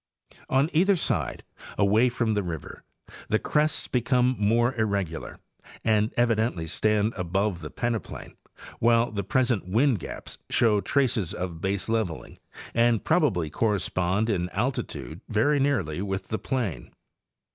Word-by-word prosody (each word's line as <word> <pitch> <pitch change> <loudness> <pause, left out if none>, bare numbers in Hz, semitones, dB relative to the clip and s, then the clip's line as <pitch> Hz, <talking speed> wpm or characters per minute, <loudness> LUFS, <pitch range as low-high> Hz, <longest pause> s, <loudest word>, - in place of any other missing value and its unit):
On 140 +5 +2
either 190 +5 +4
side, 170 - -2 0.3
away 105 +5 +4
from 115 -2 0
the 105 - +1
river, 85 -5 -6 0.5
the 110 - +2
crests 150 +5 0
become 125 0 +2
more 115 +4 +3
irregular, 100 -8 -2 0.5
and 110 0 +2
evidently 115 -7 +1
stand 105 +6 +1
above 95 +1 -1
the 75 -2 -7
peneplain, 120 -2 -4 0.4
while 115 0 +3
the 100 -2 -3
present 120 -1 +1
wind 115 +4 +2
gaps - - -8
show 105 -3 +3
traces 125 - 0
of 85 -3 -5
baseleveling, 100 -2 -2 0.3
and 115 -1 +3
probably 120 - +1
correspond 100 0 0
in 90 -5 0
altitude 105 -6 -3
very 145 +7 +2
nearly 105 - 0
with 95 -1 -4
the 110 - -2
plain. 105 - -3
110 Hz, 125 wpm, -26 LUFS, 95-120 Hz, 0.5 s, either